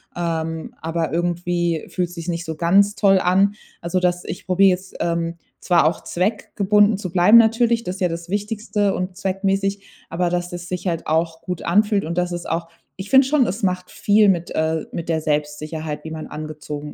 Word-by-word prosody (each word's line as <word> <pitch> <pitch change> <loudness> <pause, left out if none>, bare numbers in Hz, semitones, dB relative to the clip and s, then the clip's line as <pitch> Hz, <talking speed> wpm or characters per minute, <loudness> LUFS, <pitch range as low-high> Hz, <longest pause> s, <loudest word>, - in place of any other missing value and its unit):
ähm, 165 -1 -3
aber 165 0 -2
irgendwie 175 0 -1
fühlt 180 -2 -2
sich's 170 0 -6
nicht 170 0 -3
so 160 - -4
ganz 195 +6 +3
toll 195 -2 +4
an.” 195 +3 +2 0.3
Also, 175 +2 -1
dass 180 -1 0
ich 185 - -7
probiere 190 +1 +4
jetzt, 185 +1 -5
ähm, 170 0 -1 0.2
zwar 175 -3 +3
auch 160 +1 0
zweckgebunden 205 +2 +1
zu 195 -2 -5
bleiben 185 +5 +6
natürlich, 230 +1 +4
das 180 -2 -4
ist 195 - -11
ja 180 - +2
das 170 +1 -6
Wichtigste 205 0 -1
und 180 0 -3
zweckmäßig, 195 +1 -1 0.3
aber 175 +1 0
dass 175 0 -2
das 175 0 -7
sich 180 +1 -4
halt 165 -2 -2
auch 160 +1 0
gut 180 -2 -5
anfühlt 205 +3 +2
und 170 +2 -4
das 180 0 0
ist 175 -1 -5
auch 165 0 -2 0.3
ich 190 +1 -7
finde 265 0 +6
schon, 270 -2 +2
es 205 +5 -4
macht 180 -1 -1
viel 210 0 +3
mit 175 -3 0
äh, 160 0 -1
mit 170 0 -5
der 160 -1 +1
Selbstsicherheit, 150 0 -3
wie 160 - -7
man 160 -1 -6
angezogen 150 -1 -7
175 Hz, 195 wpm, -21 LUFS, 165-195 Hz, 0.3 s, bleiben